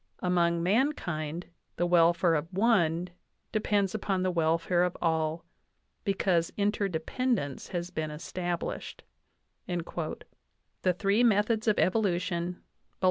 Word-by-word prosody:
Among 170 Hz, -2 st, +2 dB
mankind 175 Hz, -, 0 dB, 0.3 s
the 175 Hz, -, +1 dB
welfare 170 Hz, 0 st, +4 dB
of 160 Hz, +2 st, -1 dB
one 180 Hz, -5 st, +2 dB, 0.4 s
depends 205 Hz, -3 st, +1 dB
upon 195 Hz, -3 st, -1 dB
the 185 Hz, -, +1 dB
welfare 165 Hz, +1 st, +2 dB
of 180 Hz, 0 st, 0 dB
all, 160 Hz, 0 st, 0 dB, 0.6 s
because 185 Hz, -4 st, +1 dB
interdependence 200 Hz, -, -1 dB
has 175 Hz, 0 st, -4 dB
been 155 Hz, -3 st, -3 dB
established" 175 Hz, +3 st, -4 dB, 0.6 s
(The 175 Hz, +1 st, -4 dB
three 200 Hz, +4 st, +3 dB
Methods 220 Hz, 0 st, +2 dB
of 215 Hz, -, +3 dB
Evolution, 180 Hz, -3 st, +1 dB
Bull. -, -, -22 dB
175 Hz, 105 wpm, -29 LUFS, 170-200 Hz, 0.6 s, welfare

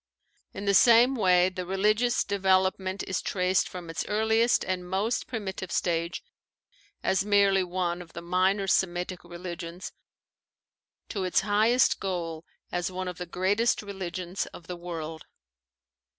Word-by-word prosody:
In 200 Hz, -, -7 dB
the 200 Hz, -, +3 dB
same 235 Hz, +5 st, +6 dB
way 185 Hz, -6 st, +4 dB
the 185 Hz, -1 st, -5 dB
religious 210 Hz, +6 st, +1 dB
development 190 Hz, 0 st, +1 dB
is 190 Hz, -, -1 dB
traced 185 Hz, 0 st, +1 dB
from 180 Hz, -2 st, -8 dB
its 165 Hz, 0 st, -3 dB
earliest 220 Hz, +3 st, +2 dB
and 180 Hz, -1 st, -3 dB
most 205 Hz, +6 st, -1 dB
primitive 190 Hz, -5 st, -5 dB
stage, 170 Hz, 0 st, -1 dB, 0.8 s
as 190 Hz, -, +2 dB
merely 200 Hz, -2 st, +4 dB
one 180 Hz, -1 st, -2 dB
of 170 Hz, -2 st, -13 dB
the 170 Hz, -, -6 dB
minor 185 Hz, +3 st, +1 dB
Semitic 180 Hz, -1 st, 0 dB
religions, 175 Hz, 0 st, -7 dB, 1.2 s
to 200 Hz, -4 st, -3 dB
its 185 Hz, -, +2 dB
highest 215 Hz, +5 st, +3 dB
goal 170 Hz, -4 st, -4 dB, 0.3 s
as 175 Hz, +1 st, -2 dB
one 185 Hz, 0 st, -4 dB
of 180 Hz, -1 st, -6 dB
the 180 Hz, -, -5 dB
great 185 Hz, +4 st, 0 dB, 0.2 s
religions 185 Hz, -2 st, -4 dB
of 170 Hz, -, -12 dB
the 180 Hz, -, -6 dB
world. 165 Hz, -2 st, -7 dB
185 Hz, 135 wpm, -27 LUFS, 175-200 Hz, 1.2 s, same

